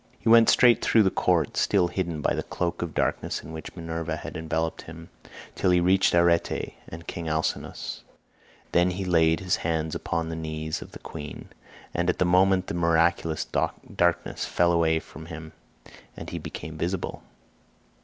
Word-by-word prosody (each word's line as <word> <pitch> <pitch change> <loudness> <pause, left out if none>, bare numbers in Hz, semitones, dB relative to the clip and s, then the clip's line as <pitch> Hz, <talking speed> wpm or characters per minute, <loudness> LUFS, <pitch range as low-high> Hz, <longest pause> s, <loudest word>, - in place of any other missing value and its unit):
61 - - -31
He - - +2
went 115 0 +7
straight 120 -2 +5
through 110 - +5
the 95 - +2
court, - - +1
still 95 -4 +3
hidden 85 -4 -3
by - - +1
the - - -1
cloak 85 -1 -3
of 85 -3 -4
darkness - - -1
in - - -9
which 80 - -8
Minerva 80 -1 -3
had 80 - -8
enveloped 80 0 -2
him, 80 +1 -11 0.4
till - - +1
he 90 -1 +5
reached 95 +1 +3
Arete 85 -1 +2 0.2
and 85 +1 -9
King 85 -1 -5
Alcinous; 80 +1 -3 0.7
then 90 +1 +4
he 95 +1 -3
laid 80 -2 +3
his 90 -2 +1
hands 80 -1 -1
upon 80 -1 -2
the 80 - -4
knees 80 -1 -4
of - - -11
the - - -7
queen, 75 -2 -8 0.4
and 85 +1 0
at 90 - +1
that 90 - +2
moment 95 +1 +4
the - - -5
miraculous 85 -1 +2
darkness 85 -1 -1
fell 85 0 +2
away 80 -1 +3
from 80 0 -12
him 80 -1 -8 0.7
and - - -7
he - - -4
became 80 +1 -7
visible. 90 +2 -3
85 Hz, 175 wpm, -26 LUFS, 80-90 Hz, 0.7 s, went